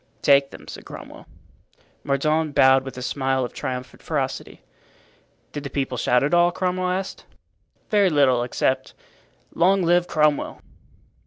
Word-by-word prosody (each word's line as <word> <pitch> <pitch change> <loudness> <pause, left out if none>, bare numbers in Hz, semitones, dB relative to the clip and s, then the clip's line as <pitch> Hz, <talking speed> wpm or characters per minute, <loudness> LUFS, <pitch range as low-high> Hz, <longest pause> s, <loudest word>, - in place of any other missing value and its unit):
"Take 140 -1 +5
them," - - -13
said - - -9
Cromwell. - - -11 0.8
Mordaunt 155 +2 0
bowed 130 0 +5
with 135 -1 -8
a 125 - -5
smile 130 -1 0
of 120 - -9
triumphant 125 -1 -6
ferocity. - - -4 0.9
"Did 145 - -5
the 140 - -5
people 135 -3 -2
shout 125 +1 +2
at 145 - 0
all?" 175 0 +5
Cromwell 185 0 -1
asked. 190 +1 -3 0.7
"Very 205 -3 +4
little, 135 -6 +3
except 125 +2 -1 0.6
'Long 190 +2 +3
live 175 +1 +3
Cromwell! 150 -2 +1
145 Hz, 140 wpm, -23 LUFS, 130-175 Hz, 0.9 s, Take